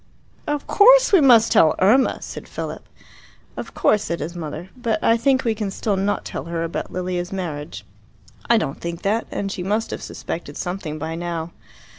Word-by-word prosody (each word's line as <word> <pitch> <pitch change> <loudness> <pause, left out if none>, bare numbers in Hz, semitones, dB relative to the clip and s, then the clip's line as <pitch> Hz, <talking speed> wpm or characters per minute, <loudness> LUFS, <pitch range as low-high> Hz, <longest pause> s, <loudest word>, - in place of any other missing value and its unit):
"Of 295 -1 -2
course - - +6
we 375 - +7
must 235 -5 +6
tell 155 - +5
Irma!" 230 +8 +3
said - - -8
Philip. - - -6 0.7
"Of - - -7
course," 210 - +3
said 170 - -3
his 165 +4 -5
mother. 165 +2 -6
"But 235 -3 -1
I 230 - +5
think 260 +3 +2
we 230 -3 +1
can 210 -2 -3
still 200 +1 -1
not 195 +2 -1
tell - - -5
her 165 0 -3
about 165 - -4
Lilia's 180 0 -3
marriage." 165 -6 -5 0.6
"I 235 - +6
don't 140 -10 -3
think 170 0 -5
that. 215 +4 0
And 195 -1 -3
she 185 - -5
must 210 +5 -1
have - - -5
suspected 150 -3 -6
something 175 -4 -4
by 160 +2 -4
now." 170 0 -4
190 Hz, 185 wpm, -22 LUFS, 170-225 Hz, 0.7 s, we